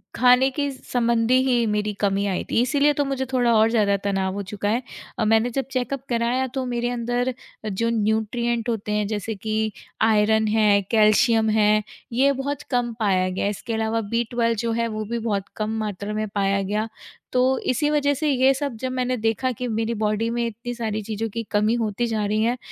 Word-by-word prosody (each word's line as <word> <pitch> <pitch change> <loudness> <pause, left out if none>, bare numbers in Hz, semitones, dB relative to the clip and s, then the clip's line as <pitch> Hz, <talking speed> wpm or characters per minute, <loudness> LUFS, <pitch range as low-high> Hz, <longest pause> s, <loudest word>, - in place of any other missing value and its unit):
खाने 250 +2 +5
के 285 +1 -1
संबंधी 235 -2 +1
ही 240 -2 +2
मेरी 210 0 -1
कमी 200 0 +1
आई 190 -2 -1
थी, - - +3
इसलिए 285 +4 +3
तो 285 0 0
मुझे 270 -1 -2
थोड़ा 245 -2 +3
और 220 +1 +5
ज़्यादा 205 -3 +2
तनाव 195 -2 0
हो 200 +1 -4
चुका 205 0 -2
है। 230 +4 +1 0.4
अ, 220 - +2
मैंने 225 +2 +3
जब 270 +2 -2
चेकअप 255 +1 -2
कराया, 240 +2 +1
तो 260 +1 -4
मेरे 240 -1 -1
अंदर 245 +1 -1 0.4
जो 230 +4 0
न्यूट्रिएंट 230 +2 0
होते 215 -2 -2
हैं, 210 0 +1
जैसे 215 +1 -3
कि 215 +2 -1 0.3
आयरन 220 0 +3
है, 210 -2 +4
कैल्शियम 220 0 +4
है, 215 0 +3 0.3
ये 270 +4 +4
बहुत 280 +1 -3
कम 245 -2 0
पाया 185 -4 +2
गया 185 - -3
है। - - +2
इसके 220 +3 -5
अलावा 225 0 0
बी-ट्वेल्व 230 0 +1
जो 230 - 0
है, 230 +1 0
वो 215 -1 -4
भी 235 +2 -3
बहुत 205 -4 -1
कम 215 +1 -2
मात्रा 210 -1 -4
में 215 0 -2
पाया 195 0 +1
गया। 210 +3 -1 0.4
तो 250 - +2 0.3
इसी 295 +4 +1
वज़ह 290 -1 +2
से 300 +2 -1
ये 265 0 +4
सब 275 -2 -3
जब 260 0 -2
मैंने 255 0 -1
देखा 225 +3 0
कि 250 +1 -4
मेरी 225 0 -1
बॉडी 215 +2 0
में 235 0 -1
इतनी 235 +2 -5
सारी 220 -2 -3
चीज़ों 220 +1 -3
की 230 +2 -4
कमी 210 +1 +2
होती 220 +2 -1
जा 220 -2 -1
रही 210 +1 0
है, 240 +2 +1
225 Hz, 205 wpm, -23 LUFS, 215-245 Hz, 0.4 s, खाने